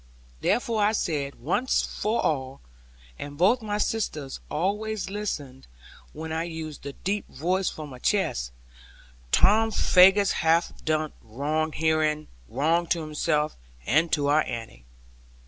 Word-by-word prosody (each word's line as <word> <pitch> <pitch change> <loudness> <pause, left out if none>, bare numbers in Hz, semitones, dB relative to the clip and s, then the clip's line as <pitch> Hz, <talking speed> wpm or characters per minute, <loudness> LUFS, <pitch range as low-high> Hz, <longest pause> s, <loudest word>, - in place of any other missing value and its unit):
Therefore 230 - +1
I 210 +1 +3
said, 145 -9 -1
once 200 - 0
for 220 +3 -1
all 135 -3 -1 0.6
(and 145 0 -7
both 200 +9 +4
my 210 -1 -2
sisters 155 -11 -2
always 200 +3 -2
listened 145 -11 -5 0.4
when 160 +1 -7
I 160 +1 -1
used 160 -3 -6
the 140 - -7
deep 200 +6 -3
voice 180 +6 0
from 150 -2 -8
my 125 - -10
chest): 60 - 0 0.8
'Tom 220 +3 +5
Faggus 195 -1 +5
hath 165 +1 +1
done 155 -1 0
wrong 150 +8 -2
herein; 155 -1 +1 0.2
wrong 165 +7 +1
to 170 0 +1
himself, 150 -1 0 0.3
and 160 +2 +2
to 145 -2 +2
our 145 +2 +4
Annie. 115 - -6
160 Hz, 130 wpm, -26 LUFS, 145-195 Hz, 0.8 s, Tom